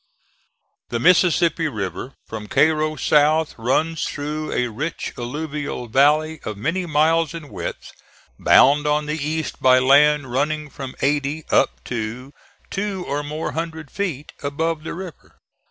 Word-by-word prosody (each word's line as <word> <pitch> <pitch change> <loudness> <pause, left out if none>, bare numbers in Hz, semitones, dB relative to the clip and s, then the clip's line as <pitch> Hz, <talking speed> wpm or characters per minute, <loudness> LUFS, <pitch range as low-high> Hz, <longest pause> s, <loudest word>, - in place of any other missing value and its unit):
The - - -2
Mississippi 170 -2 +3
River, 110 +1 -5
from 110 -1 -7
Cairo 155 +3 +2
south, 155 +1 +3
runs 155 +7 0
through 150 +1 -4
a 125 -1 0
rich 150 +9 -4
alluvial 145 0 -4
valley 150 +5 +3
of 105 -1 -6
many 165 - -2
miles 160 +1 +2
in 155 -3 -8
width, 90 -4 -6 0.5
bound 145 +2 +5
on 150 0 +1
the 150 0 -3
east 155 +1 -3
by 130 0 +6
land 140 +1 +4
running 150 +3 -1
from 135 -2 -7
eighty 145 +2 0
up - - +2
to 120 +3 -5 0.4
two 195 -2 -3
or 145 +1 -1
more 150 +2 -4
hundred 160 -2 -5
feet 165 -8 -4
above 155 +3 -2
the 160 - -5
river. 180 -2 -10
150 Hz, 140 wpm, -21 LUFS, 135-160 Hz, 0.5 s, by